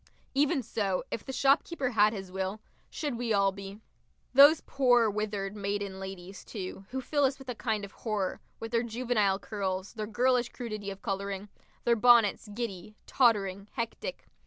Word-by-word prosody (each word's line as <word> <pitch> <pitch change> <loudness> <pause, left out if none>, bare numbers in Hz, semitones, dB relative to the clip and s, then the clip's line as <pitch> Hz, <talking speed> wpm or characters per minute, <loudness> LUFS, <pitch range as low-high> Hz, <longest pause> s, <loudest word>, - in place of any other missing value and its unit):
Even 280 0 +2
so, 205 -4 -1
if 230 - -3
the - - -6
shopkeeper 275 +1 +2
had 210 -2 +5
his 195 -4 -7
will, 190 +2 -3 0.3
should 285 -7 -3
we 240 -2 -1
all 200 -1 +3
be. 195 +1 -9 0.5
Those 285 +4 +8
poor 245 -5 +4
withered 205 -1 -3
maiden 200 -1 -3
ladies, 190 0 -8
too, 195 -2 -7
who 265 +1 -3
fill 290 +3 0
us 270 0 +2
with 270 -1 -11
a - - -1
kind 220 -3 -2
of 195 - -13
horror, 210 -5 -3 0.2
with 225 0 -6
their 230 -1 +2
juvenile 230 -4 +1
curls, 195 -2 -3
their 215 -1 -4
girlish 245 +2 +2
crudity 215 -5 -5
of 195 0 -8
colouring, 200 0 -3 0.3
their 235 - +4
bonnets, 230 -2 +5
giddy, 210 -3 -5
tottering, 200 -6 +2
hectic. 335 - -4
215 Hz, 165 wpm, -30 LUFS, 195-245 Hz, 0.5 s, Those